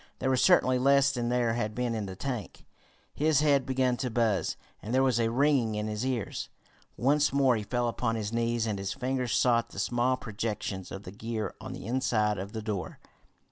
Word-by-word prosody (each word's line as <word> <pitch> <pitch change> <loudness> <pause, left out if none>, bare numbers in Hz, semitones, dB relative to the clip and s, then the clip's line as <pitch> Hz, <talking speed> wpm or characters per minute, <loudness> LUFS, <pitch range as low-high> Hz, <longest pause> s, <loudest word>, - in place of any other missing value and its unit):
There 130 0 0
was 130 - +2
certainly 130 0 +4
less 140 +1 +4
than 120 -3 -2
there 120 -2 +1
had 110 -2 -2
been 125 -1 -1
in 110 -3 -3
the 95 - -7
tank. 120 -3 -5 0.5
His 150 -1 +2
head 140 -3 +3
began 130 -1 +1
to 130 -1 -2
buzz, 110 -4 0 0.2
and 115 +4 -3
there 130 - +4
was 130 -3 +2
a 115 -1 +2
ringing 125 -3 +2
in 105 0 -2
his 105 +1 -3
ears. 125 -6 -3 0.5
Once 145 +4 +3
more 135 -3 +3
he 110 - -2
fell 120 +3 -1
upon 115 0 -1
his 110 0 -3
knees, 115 0 0
and 105 -3 -2
his 100 0 -3
fingers 125 -1 -1
sought 120 -2 +3
the - - -13
small 120 +5 +1
projections 105 -4 -4
of 100 - -7
the 90 - -8
gear 110 +1 -4
on - - -6
the - - -8
inside 110 -4 +1
of 100 +2 -6
the 110 -1 -4
door. 105 -4 -4
120 Hz, 210 wpm, -29 LUFS, 110-130 Hz, 0.5 s, certainly